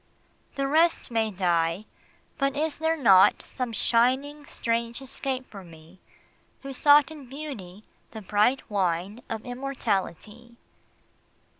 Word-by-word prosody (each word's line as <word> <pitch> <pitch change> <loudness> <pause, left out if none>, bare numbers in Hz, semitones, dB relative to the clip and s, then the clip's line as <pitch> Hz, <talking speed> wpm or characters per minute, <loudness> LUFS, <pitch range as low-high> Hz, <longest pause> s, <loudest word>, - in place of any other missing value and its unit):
The 275 -1 -1
rest 320 -1 +2
may 225 -1 +1
die 175 -1 0 0.5
but 275 -1 0
is 305 0 -2
there 320 +1 +1
not 195 -9 +5
Some 250 -2 -5
shining 260 +6 +1
strange 230 0 -2
escape 265 0 -5
for 195 -2 -10
me 165 +1 -16 0.6
Who 275 0 -6
sought 290 +2 +5
in 290 -5 -11
Beauty 240 -10 -8 0.3
the 220 - -9
bright 210 +7 +1
wine 195 +1 -1
Of 225 +1 -5
immortality? 240 -3 -4
235 Hz, 120 wpm, -26 LUFS, 200-275 Hz, 0.6 s, not